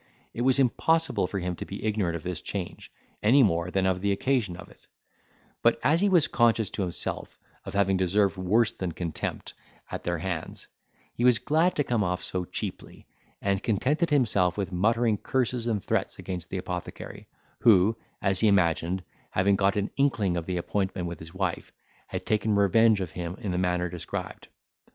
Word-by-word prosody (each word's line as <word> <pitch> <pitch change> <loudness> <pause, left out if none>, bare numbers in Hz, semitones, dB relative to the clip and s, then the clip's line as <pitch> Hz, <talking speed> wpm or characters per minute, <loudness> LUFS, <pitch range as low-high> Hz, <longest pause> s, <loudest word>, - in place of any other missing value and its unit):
It 120 - -4
was 130 +1 +4
impossible 140 - +2
for 100 - -4
him 90 -1 -2
to - - -5
be - - -8
ignorant 105 -6 0
of 85 - -6
this 90 -3 -4
change, - - -6 0.3
any 130 +6 +5
more 85 -4 +1
than 95 +1 0
of 95 -1 +1
the 100 0 +1
occasion 110 -3 0
of 95 - -10
it; - - -21 0.7
but - - +3
as 160 +6 +3
he 205 - +3
was 175 -5 +5
conscious 115 -3 +2
to - - -3
himself 90 -3 -3 0.3
of - - -7
having 95 -1 +3
deserved 95 +2 +2
worse 105 +5 +2
than 90 -3 -4
contempt 85 -1 -4 0.4
at - - -5
their 85 0 -1
hands, 85 -1 -5 0.5
he 120 - -3
was 125 -2 +6
glad 160 +8 +1
to 145 - +1
come 120 -5 0
off 90 -1 -2
so 90 -1 -3
cheaply, - - -6 0.4
and 100 0 +1
contented 135 - +1
himself 105 - +2
with 95 -2 -2
muttering 110 +3 +2
curses 125 -2 -1
and 105 -4 -1
threats - - -1
against 90 -2 -6
the 95 - -3
apothecary, 90 -1 -6 0.3
who, 105 -1 +5 0.3
as 95 -1 +3
he 110 - +4
imagined, 90 -1 +2 0.3
having 100 +1 +2
got 100 0 +2
an 100 0 -1
inkling 115 -10 +1
of 85 -1 -3
the 90 -1 -1
appointment 95 0 -2
with 85 -2 -6
his 80 +3 -11
wife, 95 -2 -2 0.4
had - - -5
taken 110 0 +1
revenge 105 +2 +4
of 90 -4 -4
him 85 +1 -5
in 105 -6 -3
the 90 - -1
manner 90 -1 0
described. 85 -1 -6
100 Hz, 185 wpm, -27 LUFS, 90-115 Hz, 0.7 s, was